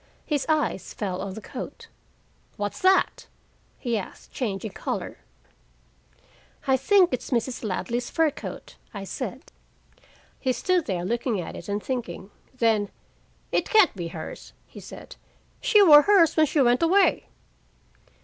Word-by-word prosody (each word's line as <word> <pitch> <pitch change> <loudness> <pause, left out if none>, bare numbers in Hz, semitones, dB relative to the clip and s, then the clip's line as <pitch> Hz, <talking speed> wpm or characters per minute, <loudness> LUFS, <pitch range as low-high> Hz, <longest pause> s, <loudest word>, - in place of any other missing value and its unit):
His 290 -3 -1
eyes 305 -10 0
fell 190 -3 -3
on 195 -1 -5
the 220 - -7
coat. 460 - -8 0.7
"What's 205 0 -3
that?" 380 0 +3 0.5
he 235 -4 -1
asked, 190 - -11
changing 210 -4 -3
color. - - -5 1.5
"I 265 - +4
think 365 +4 +4
it's 250 - -3
Mrs. 245 0 -1
Ladley's 235 +4 -2
fur 325 -2 +2
coat," - - -9 0.2
I 200 - -5
said. 195 - -6 0.9
He 255 - 0
stood 360 +4 0
there 180 -3 -2
looking 235 0 -1
at 170 - -6
it - - -9
and 205 +1 -2
thinking. 210 -6 -5 0.2
Then: 225 -5 +1 0.6
"It - - 0
can't 425 - +5
be 175 -3 -4
hers," 165 -1 -8
he - - -13
said. - - -11 0.4
"She 420 -1 +5
wore 295 -5 +9
hers 340 -2 +4
when 315 -1 +4
she 285 +1 +2
went 245 +1 +3
away." 360 +1 +3
245 Hz, 140 wpm, -25 LUFS, 205-315 Hz, 1.5 s, wore